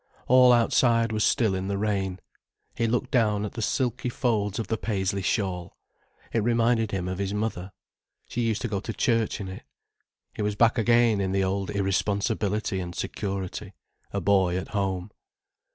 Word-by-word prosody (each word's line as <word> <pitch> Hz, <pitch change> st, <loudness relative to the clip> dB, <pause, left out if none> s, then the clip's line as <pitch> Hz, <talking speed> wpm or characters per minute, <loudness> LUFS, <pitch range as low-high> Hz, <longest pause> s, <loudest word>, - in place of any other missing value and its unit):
All 125 Hz, 0 st, +7 dB
outside 115 Hz, -1 st, +3 dB
was 110 Hz, -1 st, 0 dB
still 115 Hz, -7 st, +2 dB
in 95 Hz, 0 st, -2 dB
the 100 Hz, 0 st, -1 dB
rain. 100 Hz, -3 st, -1 dB, 0.6 s
He 115 Hz, -, 0 dB
looked 125 Hz, +2 st, -1 dB
down 105 Hz, -4 st, +2 dB
at 105 Hz, -, -6 dB
the 115 Hz, -, -5 dB
silky 125 Hz, +2 st, -1 dB
folds 105 Hz, -5 st, 0 dB
of 115 Hz, -, -2 dB
the 110 Hz, -, -1 dB
paisley 100 Hz, -3 st, -1 dB
shawl. 90 Hz, -3 st, -2 dB, 0.6 s
It 115 Hz, -, +2 dB
reminded 115 Hz, 0 st, +2 dB
him 95 Hz, -3 st, -3 dB
of 95 Hz, +1 st, -4 dB
his 100 Hz, 0 st, -2 dB
mother. 105 Hz, -3 st, -3 dB, 0.6 s
She 120 Hz, -, -3 dB
used 115 Hz, -2 st, 0 dB
to -, -, 0 dB
go 100 Hz, -3 st, -2 dB
to 110 Hz, +3 st, -5 dB
church 115 Hz, -2 st, +1 dB
in 100 Hz, -, -5 dB
it. 95 Hz, 0 st, -7 dB, 0.7 s
He -, -, -5 dB
was 105 Hz, 0 st, -1 dB
back 115 Hz, +3 st, +3 dB
again 115 Hz, -2 st, +4 dB
in 95 Hz, -1 st, -1 dB
the 95 Hz, 0 st, +2 dB
old 95 Hz, +1 st, -1 dB
irresponsibility 100 Hz, +1 st, 0 dB
and 90 Hz, -1 st, -5 dB
security, 100 Hz, +1 st, -4 dB, 0.4 s
a 100 Hz, -, -1 dB
boy 95 Hz, -1 st, +2 dB
at 95 Hz, -, -5 dB
home. 95 Hz, -2 st, -2 dB
105 Hz, 175 wpm, -26 LUFS, 95-115 Hz, 0.7 s, All